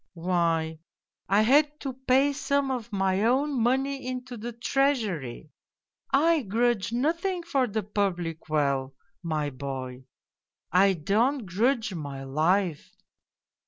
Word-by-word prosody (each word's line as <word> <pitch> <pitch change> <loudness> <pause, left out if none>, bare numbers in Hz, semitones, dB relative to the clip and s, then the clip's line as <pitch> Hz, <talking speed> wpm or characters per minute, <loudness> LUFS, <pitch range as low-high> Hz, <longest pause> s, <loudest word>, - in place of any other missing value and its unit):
" - - -49
' - - -59 0.2
Why, 165 -3 +1 0.5
I 200 +2 +4
had 295 +5 +3
to 270 -2 -4
pay 265 +2 +2
some 280 -1 0
of 235 -3 -4
my 195 0 +1
own 265 +2 +2
money 265 +2 0
into 255 -1 -5
the 235 +2 -6
Treasury. 225 - -1 0.6
I 315 +3 +3
grudge 230 -1 0
nothing 335 +8 0
for 275 -7 +1
the 220 -1 -2
public 180 -6 -2
weal, 140 -3 0 0.3
my 155 -4 -2
boy! 130 -1 -6 0.7
I 195 +2 +5
don't 220 - +1
grudge 220 +3 0
my 140 -5 -6
life. 160 +5 0
215 Hz, 125 wpm, -27 LUFS, 165-265 Hz, 0.7 s, I